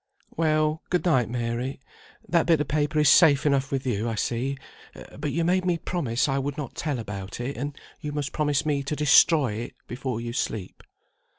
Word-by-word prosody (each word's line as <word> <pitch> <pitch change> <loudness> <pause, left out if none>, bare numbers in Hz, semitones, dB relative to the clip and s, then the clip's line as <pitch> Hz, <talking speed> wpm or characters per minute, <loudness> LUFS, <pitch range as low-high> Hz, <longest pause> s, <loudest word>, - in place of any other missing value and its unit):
"Well, 155 -1 +1
good 180 0 0
night, 130 -10 +3
Mary. 120 +2 -3 0.5
That 170 -2 +2
bit 165 -3 +4
of 150 - -1
paper 150 +2 0
is 150 -1 +4
safe 145 -2 +6
enough 140 -1 +1
with 135 -1 -2
you, 115 -2 -1
I 115 - -2
see. 125 +5 -2 0.6
But 145 0 -3
you 165 +3 0
made 185 +2 +2
me 175 -2 +1
promise 155 -9 -1
I 135 0 0
would 140 +2 -3
not 145 -5 -5
tell 150 -4 -2
about 100 -3 -6
it, 125 +3 -3
and 145 +4 -5 0.2
you 150 -2 -5
must 145 -1 -3
promise 145 -1 0
me 145 -2 +1
to 140 +2 -3
destroy 150 -3 +5
it 115 +3 -6
before 125 -1 -4
you 120 0 -5
sleep." 110 -6 -4
140 Hz, 195 wpm, -26 LUFS, 120-155 Hz, 0.6 s, safe